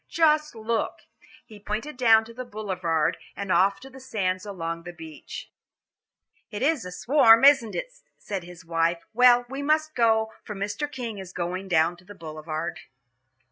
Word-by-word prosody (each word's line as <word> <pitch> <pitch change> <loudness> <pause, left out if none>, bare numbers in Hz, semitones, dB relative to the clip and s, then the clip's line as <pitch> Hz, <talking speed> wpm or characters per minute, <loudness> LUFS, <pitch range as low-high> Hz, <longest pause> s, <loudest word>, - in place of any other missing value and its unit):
Just 305 -3 +2
look!" 225 +1 -2 0.4
he 215 -4 -13
pointed 215 +8 -4
down 225 -3 +5
to 230 - -12
the 255 +2 -6
Boulevard 185 -9 -1 0.2
and 200 -2 -4
off 195 +3 +3
to - - -10
the 265 - -12
sands 195 -6 -2
along 170 -4 -4
the 175 +1 -8
beach. 160 -3 -10 1.0
"It 210 +1 -4
is 290 - +1
a 180 - -6
swarm, 230 +3 +5
isn't 270 -7 +5
it?" - - -4 0.2
said 195 -3 -5
his 175 0 -12
wife. 165 0 0
"Well, 245 +1 +6
we 270 +3 -5
must 310 +2 +1
go, 220 -3 +2
for 210 - -7
Mr. 205 +9 -3
King 235 -6 -5
is 190 -2 -8
going 180 +2 -3
down 170 -1 +2
to 180 - -19
the 205 +3 -13
Boulevard." 155 0 -5
210 Hz, 170 wpm, -26 LUFS, 175-245 Hz, 1.0 s, Well